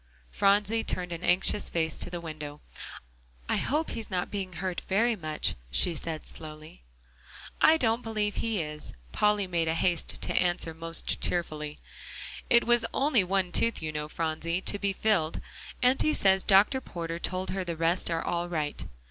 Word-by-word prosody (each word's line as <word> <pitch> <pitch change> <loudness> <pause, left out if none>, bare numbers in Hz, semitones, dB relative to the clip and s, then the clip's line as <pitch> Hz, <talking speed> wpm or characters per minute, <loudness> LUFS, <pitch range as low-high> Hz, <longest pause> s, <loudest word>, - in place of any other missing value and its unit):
Phronsie 205 +3 +2
turned 180 -1 -3
an 170 +1 -5
anxious 180 +3 +3
face 160 -2 -1
to - - -3
the 175 0 -5
window. 150 -3 -7 0.9
"I - - +1
hope 305 +4 0
he's 225 -2 -6
not 180 -2 -2
being 190 -2 -4
hurt 180 +1 -3
very 225 +5 +3
much," 155 -5 -1 0.2
she 170 - +2
said 160 0 -5
slowly. 155 - -10 0.8
"I 320 +1 +7
don't 230 -4 +1
believe 215 -2 -2
he 220 -6 0
is," 150 0 -5 0.2
Polly 210 -1 +2
made 170 -3 -1
haste 165 +1 0
to - - -1
answer 175 -2 +1
most 165 +1 -1
cheerfully, 150 -4 -2 0.7
"it 235 -1 +6
was 240 -1 +4
only 270 -7 +3
one 185 -1 0
tooth, 230 -4 +2
you 155 - -2
know, 150 0 -4
Phronsie, 165 +2 -2
to 205 - +3
be 200 -1 0
filled. 195 -6 +1 0.4
Auntie 265 +5 +3
says 190 -1 +3
Dr. 205 +7 +5
Porter 170 -5 -5
told 185 +1 -2
her 190 0 -2
the 170 -2 -4
rest 165 +3 +1
are 165 -1 -1
all 175 0 -1
right." 155 -4 -2
180 Hz, 165 wpm, -28 LUFS, 165-210 Hz, 0.9 s, I